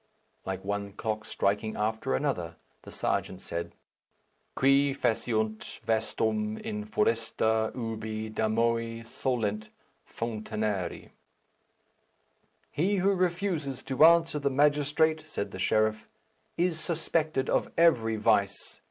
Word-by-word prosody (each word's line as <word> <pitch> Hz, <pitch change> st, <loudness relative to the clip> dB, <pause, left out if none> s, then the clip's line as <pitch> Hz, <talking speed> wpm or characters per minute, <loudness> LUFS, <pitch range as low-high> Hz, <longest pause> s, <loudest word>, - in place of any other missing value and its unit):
Like 95 Hz, 0 st, -4 dB
one 100 Hz, 0 st, -3 dB
clock 110 Hz, +1 st, -3 dB
striking 105 Hz, +2 st, -1 dB
after 110 Hz, -9 st, 0 dB
another, -, -, -2 dB, 0.3 s
the -, -, -12 dB
serjeant 95 Hz, -, -2 dB
said, 85 Hz, -1 st, -5 dB, 0.8 s
"Qui 135 Hz, +1 st, +4 dB
faciunt 110 Hz, -3 st, -1 dB
vastum 110 Hz, -1 st, 0 dB
in 105 Hz, 0 st, -4 dB
foresta 110 Hz, 0 st, +1 dB
ubi 110 Hz, -2 st, -4 dB
damoe 115 Hz, +1 st, 0 dB
solent 110 Hz, -4 st, -2 dB, 0.4 s
founinare." 110 Hz, -5 st, -3 dB, 1.6 s
"He 190 Hz, +7 st, +1 dB
who 195 Hz, +1 st, +3 dB
refuses 175 Hz, -7 st, -1 dB
to 135 Hz, +2 st, +2 dB
answer 165 Hz, -2 st, +6 dB
the 140 Hz, -1 st, +1 dB
magistrate," 150 Hz, +3 st, +2 dB
said 130 Hz, -, -4 dB
the 95 Hz, -, -7 dB
sheriff, 110 Hz, +2 st, +1 dB, 0.5 s
"is 170 Hz, -2 st, +1 dB
suspected 160 Hz, -4 st, -1 dB
of -, -, 0 dB
every 120 Hz, -10 st, +4 dB
vice. 105 Hz, -2 st, 0 dB
115 Hz, 105 wpm, -29 LUFS, 110-145 Hz, 1.6 s, answer